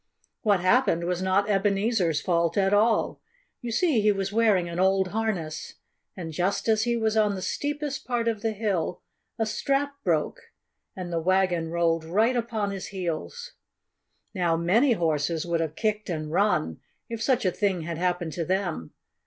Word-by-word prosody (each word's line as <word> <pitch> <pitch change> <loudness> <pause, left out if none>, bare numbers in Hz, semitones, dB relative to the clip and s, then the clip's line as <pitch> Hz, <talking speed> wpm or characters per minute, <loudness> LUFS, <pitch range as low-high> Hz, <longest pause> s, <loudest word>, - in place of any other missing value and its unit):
What 205 -4 +2
happened 185 -3 +3
was 180 +1 -1
not 190 +2 +2
Ebenezer's 195 -4 +1
fault 170 -1 +1
at 195 0 +3
all. 220 +2 +2 0.4
You 240 - -4
see, 270 -1 +2
he 210 0 +4
was 195 0 -2
wearing 210 -6 +3
an 170 +1 -5
old 190 0 +3
harness. 195 -7 -3 0.4
And 165 -3 -6
just 180 +8 -1
as 220 0 +3
he 235 0 +1
was 220 -1 0
on 210 -2 +3
the 190 - -5
steepest 290 -1 -3
part 240 -2 0
of 220 -3 -1
the 225 0 -1
hill 195 -5 -2 0.3
a 225 - +1
strap 275 +6 -1
broke - - 0 0.6
and 180 -2 -6
the 165 - 0
wagon 180 -2 +1
rolled 165 -1 +1
right 215 +10 +2
upon 225 -4 -1
his 195 -1 -5
heels. 195 - -5 0.8
Now, 175 -4 +1
many 220 +11 +3
horses 160 -3 0
would 170 -1 0
have 160 -1 -2
kicked 215 0 -1
and 155 -3 -3
run, 165 - +1 0.3
if 230 -1 -5
such 255 -3 +1
a 185 - +3
thing 195 -3 0
had 165 0 -5
happened 175 -3 -1
to 170 - -2
them. 180 - -2
195 Hz, 170 wpm, -26 LUFS, 170-220 Hz, 0.8 s, he